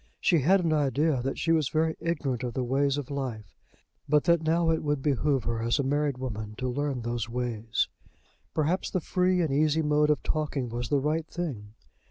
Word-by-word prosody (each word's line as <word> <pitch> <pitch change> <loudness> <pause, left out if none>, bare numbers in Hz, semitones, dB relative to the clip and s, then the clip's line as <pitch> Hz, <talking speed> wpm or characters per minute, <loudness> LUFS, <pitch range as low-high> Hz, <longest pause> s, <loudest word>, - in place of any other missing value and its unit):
She 170 - +3
had 180 +6 +3
an 160 - +2
idea 145 -1 +1
that 135 +2 -3
she 165 - 0
was 155 -4 +2
very 160 0 +1
ignorant 140 -7 -2
of 125 -2 -4
the 130 - 0
ways 135 +3 +1
of 145 -1 -5
life; 120 -8 -4 0.6
but 150 0 +4
that 170 -1 +3
now 165 +1 +2
it 160 - 0
would 145 -2 -1
behove 140 -2 +1
her, 115 0 -2
as 115 +3 +1
a 140 - +1
married 145 0 0
woman, 110 -5 -5
to 130 - -2
learn 135 -1 -2
those 120 -1 -3
ways. 115 -2 -1 0.7
Perhaps 160 +4 0
the 185 - 0
free 180 +2 +1
and 150 -4 -1
easy 155 +2 +2
mode 150 0 +3
of 150 - +1
talking 145 -5 -1
was 120 0 -4
the 145 - +3
right 155 +3 -1
thing. 115 -12 -5
145 Hz, 205 wpm, -28 LUFS, 125-155 Hz, 0.7 s, but